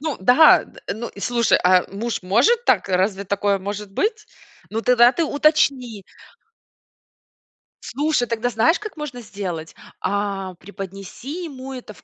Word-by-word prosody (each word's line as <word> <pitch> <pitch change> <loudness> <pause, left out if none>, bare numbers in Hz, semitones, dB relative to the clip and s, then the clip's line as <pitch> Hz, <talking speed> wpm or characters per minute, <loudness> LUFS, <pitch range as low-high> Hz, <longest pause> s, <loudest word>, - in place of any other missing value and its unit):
Ну 305 -2 -3
да, 250 +10 +6
д - - -17
ну 225 +3 -6
и, 200 - -13
слушай, 235 0 +2
а 180 0 +5
муж 230 +2 -3
может 245 - +2
так? - - +2
Разве 190 +2 0
такое 200 0 0
может 205 +1 -6
быть? 425 - -1 0.4
Ну, 225 +1 -2
тогда 245 0 +5
ты 335 - 0
уточни. 275 - +1 1.8
Слушай, 290 -2 -1
тогда 230 +1 -1
знаешь, 245 +10 +2
как 425 -4 -8
можно 280 -5 -6
сделать? 185 -7 -6 0.3
А 195 -1 -2
преподнеси 195 - -8
ему 265 -3 -8
это 245 -4 -9
в - - -21
230 Hz, 145 wpm, -21 LUFS, 195-275 Hz, 1.8 s, да